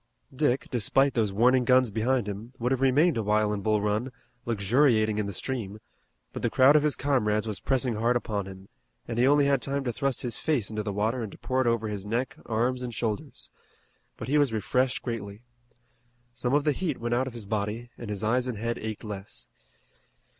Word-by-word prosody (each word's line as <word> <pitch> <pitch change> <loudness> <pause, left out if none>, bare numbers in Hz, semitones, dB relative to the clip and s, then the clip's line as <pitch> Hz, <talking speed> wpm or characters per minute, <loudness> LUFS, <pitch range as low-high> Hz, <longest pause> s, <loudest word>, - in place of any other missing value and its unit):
Dick, 135 -2 +1
despite 135 +3 +2
those 110 -4 +1
warning 125 +5 +4
guns 130 -2 +4
behind 115 +2 0
him, 105 +5 -6
would 125 +1 -1
have 135 -1 0
remained 140 +4 +4
a - - +1
while 105 0 +1
in 100 - -3
Bull 110 0 +1
Run, 105 +5 -1 0.4
luxuriating 110 0 +2
in 105 - -1
the - - -3
stream, 105 -1 -4 0.5
but - - -5
the - - +1
crowd 130 +3 +5
of 150 - +6
his 150 -2 +1
comrades 110 -6 +1
was 105 -5 -4
pressing 125 -4 0
hard 120 +3 +2
upon 105 -5 -2
him, 95 0 -11 0.4
and 115 0 -3
he 125 - +5
only 145 0 +5
had 140 -2 +2
time 140 +3 -2
to 120 -2 -2
thrust 135 +3 -1
his 120 -2 -3
face 135 -10 0
into 110 0 -2
the 105 -1 -3
water 110 +5 -1
and 110 -3 -5
to - - -12
pour 130 0 -1
it 130 - +1
over 115 -1 +1
his 105 -2 -4
neck, 115 +5 -2
arms, 120 +3 0
and 120 -2 -5
shoulders. 110 -2 -4 0.7
But 110 - -6
he 150 +3 +3
was 145 -4 +3
refreshed 125 +4 0
greatly. 110 -3 -5 0.9
Some 125 +3 -1
of 145 - +3
the 150 - +3
heat 155 -1 -2
went 120 +1 -2
out 130 +2 +1
of 130 - -6
his 115 -3 -7
body, 110 +3 -3
and 115 - -8
his 105 0 -4
eyes 125 +4 +1
and 125 -4 -3
head 115 +2 -2
ached 110 -1 -5
less. 105 -2 -7
115 Hz, 215 wpm, -27 LUFS, 105-130 Hz, 0.9 s, of